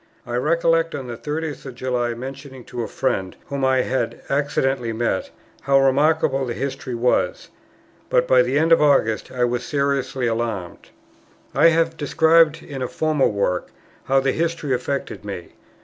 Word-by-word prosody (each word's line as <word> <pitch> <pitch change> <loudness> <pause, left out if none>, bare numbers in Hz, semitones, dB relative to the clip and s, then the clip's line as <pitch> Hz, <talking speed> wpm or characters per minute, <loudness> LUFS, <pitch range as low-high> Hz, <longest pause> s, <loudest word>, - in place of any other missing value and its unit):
I 120 - -4
recollect 165 +4 +2
on 135 - -5
the 120 -1 -6
30th 150 +4 -4
of 130 - -8
July 125 -2 -1
mentioning 135 +1 -8
to 120 0 -6
a 115 - -3
friend, 95 -9 -2
whom 140 -1 -3
I 130 -1 +3
had 120 -2 -2
accidentally 135 -4 0
met, 110 -4 -1 0.3
how 135 0 +3
remarkable 135 +1 +2
the 120 -2 -3
history 135 -2 -4
was; 120 +2 0 0.6
but - - +2
by - - +6
the - - 0
end 160 +2 +2
of 165 - +6
August 140 -7 +2
I 125 -1 -1
was 120 0 0
seriously 140 -3 -1
alarmed. 115 -6 -3 0.6
I - - +5
have 165 0 +2
described 160 +2 +3
in 135 -3 -7
a 125 - -1
former 155 -1 +1
work, 100 -3 -1 0.4
how 135 0 +3
the 135 0 +1
history 165 -3 -1
affected 130 -1 -3
me. 100 -4 -7
135 Hz, 165 wpm, -22 LUFS, 120-150 Hz, 0.6 s, by